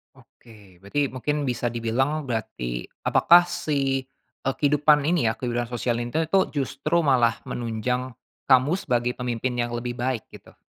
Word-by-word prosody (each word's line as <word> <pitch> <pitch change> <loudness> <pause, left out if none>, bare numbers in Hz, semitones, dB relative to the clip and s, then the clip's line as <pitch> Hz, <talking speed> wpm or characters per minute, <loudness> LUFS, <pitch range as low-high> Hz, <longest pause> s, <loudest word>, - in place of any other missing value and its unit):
Oke, 105 -6 -19
berarti 130 +9 -1
mungkin 145 +3 -2
bisa 125 -2 -1
dibilang 120 +6 -1
berarti 110 - -4 0.2
apakah 175 +1 +6
si, 135 -6 -1 0.4
eee, 135 - 0
kehidupan 150 0 +3
ini 160 -5 +2
ya, 110 - 0
kehidupan 120 -1 -2
sosial 120 0 -1
ini 120 +2 -5 0.2
tuh 195 -1 +4
justru 145 +4 0
malah 120 -5 +3
menunjang 120 +2 -3 0.3
kamu 130 +4 +5
sebagai 125 -6 0
pemimpin 125 0 -2
yang 120 0 -1
lebih 120 0 -4
baik 125 -3 -1
gitu? - - -15
125 Hz, 145 wpm, -24 LUFS, 120-140 Hz, 0.4 s, apakah